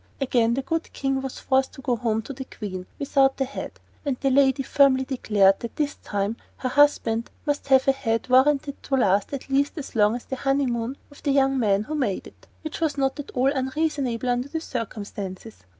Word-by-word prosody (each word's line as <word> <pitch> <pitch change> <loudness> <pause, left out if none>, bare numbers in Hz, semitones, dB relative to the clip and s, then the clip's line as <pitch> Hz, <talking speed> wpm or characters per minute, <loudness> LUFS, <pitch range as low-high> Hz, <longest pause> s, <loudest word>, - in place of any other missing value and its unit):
Again 235 -4 +2
the 270 - -2
good 325 +4 -2
King 270 -1 -1
was 265 -1 -6
forced 265 0 +1
to - - -11
go 250 -3 +1
home 225 -2 -1
to 275 - -7
the 265 0 -7
Queen 185 -6 -7
without 275 -1 +2
a 270 - +2
head, 270 - -6 0.3
and 280 -4 -1
the 270 -2 +1
lady 270 0 +4
firmly 265 -1 +4
declared 205 -7 +3
that 235 - -7
this 290 -1 -1
time 205 +2 -3 0.2
her 255 - -2
husband 245 -5 +3 0.2
must 290 -1 -1
have 265 -1 +4
a - - +7
head 250 -4 -1
warranted 275 +2 +3
to 270 - -1
last 200 -6 +2
at 280 -2 -5
least 280 +4 +1
as 280 -3 -7
long 210 +1 +4
as 245 - -7
the 265 - -4
honeymoon 265 -2 0
of 285 - -15
the 290 - -1
young 270 -1 +3
man 205 -3 +2
who 305 - -6
made 250 -11 -1
it; - - -16 0.2
which 310 +1 -6
was 315 -3 0
not 270 0 0
at 290 - -6
all 260 +2 +3
unreasonable 265 -3 -1
under 245 +1 0
the 320 +3 -3
circumstances. 200 - -6
265 Hz, 210 wpm, -24 LUFS, 230-275 Hz, 0.3 s, a